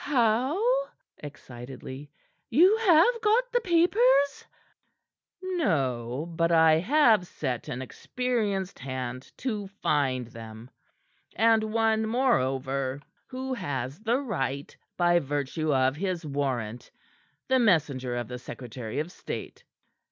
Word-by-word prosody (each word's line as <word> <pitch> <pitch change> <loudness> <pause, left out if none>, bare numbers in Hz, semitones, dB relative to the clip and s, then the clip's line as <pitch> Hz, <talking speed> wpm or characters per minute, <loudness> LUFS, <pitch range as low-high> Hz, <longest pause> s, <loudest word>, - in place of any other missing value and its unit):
"How?" 295 - +2 0.3
excitedly. 135 0 -9 0.4
"You 365 +8 +6
have 440 +3 +4
got 470 +3 +2
the 485 +1 +2
papers?" 345 - +3 1.0
"No; 140 - -1
but 165 +1 +1
I 160 -1 +5
have 225 - +4
set 130 -8 -4
an 125 +1 -4
experienced 205 - -2
hand 130 -1 -5
to 215 -6 -3
find 140 - 0
them, 115 +1 -11 0.6
and 225 0 +4
one, 220 0 +1
moreover, 135 - 0 0.3
who 260 0 -4
has 135 - -4
the 230 +3 +1
right 140 - -3 0.2
by 175 -1 +4
virtue 145 +2 -2
of 130 0 +2
his 180 -2 -3
warrant 130 -6 -3 0.6
the 260 0 +3
messenger 145 - +1
of 120 -2 -3
the 125 0 -7
secretary 120 -2 -7
of 155 +4 -2
state." - - -7
165 Hz, 110 wpm, -27 LUFS, -, 1.0 s, You